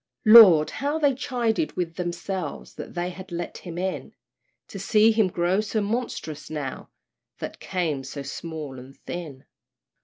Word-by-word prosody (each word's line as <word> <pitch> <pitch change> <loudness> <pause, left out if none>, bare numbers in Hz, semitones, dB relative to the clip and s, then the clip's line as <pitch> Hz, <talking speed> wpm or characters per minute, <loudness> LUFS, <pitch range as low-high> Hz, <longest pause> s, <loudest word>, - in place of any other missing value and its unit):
Lord! 210 -9 +9
how 285 +3 -2
they 290 -3 +3
chided 250 +2 -1
with 170 -2 -2
themselves, 175 -1 -4
That - - -9
they 175 +1 -2
had 185 +1 -11
let 175 0 -5
him 175 -2 -8
in; 180 -7 -4 0.5
To 195 - -7
see 215 +3 +4
him 220 -3 +3
grow 180 +2 +1
so 215 +1 -2
monstrous 210 - -3
now, 145 -4 -5 0.5
That - - -7
came 160 -7 -2
so 140 +1 -7
small 150 -1 -6
and 130 +2 -13
thin. 155 -7 -7
180 Hz, 150 wpm, -25 LUFS, 155-215 Hz, 0.5 s, Lord